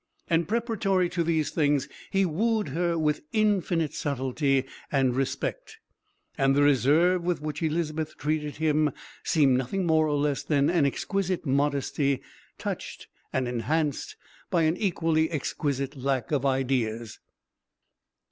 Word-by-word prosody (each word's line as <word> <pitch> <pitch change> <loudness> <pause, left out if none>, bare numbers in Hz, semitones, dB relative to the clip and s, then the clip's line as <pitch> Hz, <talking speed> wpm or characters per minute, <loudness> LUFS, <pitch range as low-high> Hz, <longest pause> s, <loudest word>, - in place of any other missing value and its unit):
And 165 -1 +1
preparatory 210 -5 +1
to 175 -1 -1
these 160 -3 0
things 145 -3 +1 0.2
he 195 0 +2
wooed 210 +2 0
her 170 +3 0
with 150 -1 +1
infinite 190 -7 +1
subtlety 135 -1 0 0.3
and 130 -3 +2
respect. 435 - -3 0.6
And 135 0 +3
the 145 - +4
reserve 150 +6 +4
with 175 0 0
which 150 +2 -5
Elizabeth 155 -1 -2
treated 150 -1 -2
him 155 -2 +1 0.3
seemed 135 -5 +3
nothing 180 +9 -2
more 160 -1 +3
nor 150 - 0
less 145 -1 0
than 145 -1 +2
an 165 -5 +3
exquisite 185 +4 -2
modesty 140 0 0 0.3
touched - - -6 0.2
and 130 -1 0
enhanced 145 +5 -1 0.3
by 170 -2 +2
an 160 +1 +2
equally 165 -5 +1
exquisite 140 -2 -2
lack 135 -2 -1
of 140 -2 +1
ideas. 125 -4 -1
150 Hz, 130 wpm, -27 LUFS, 135-170 Hz, 0.6 s, the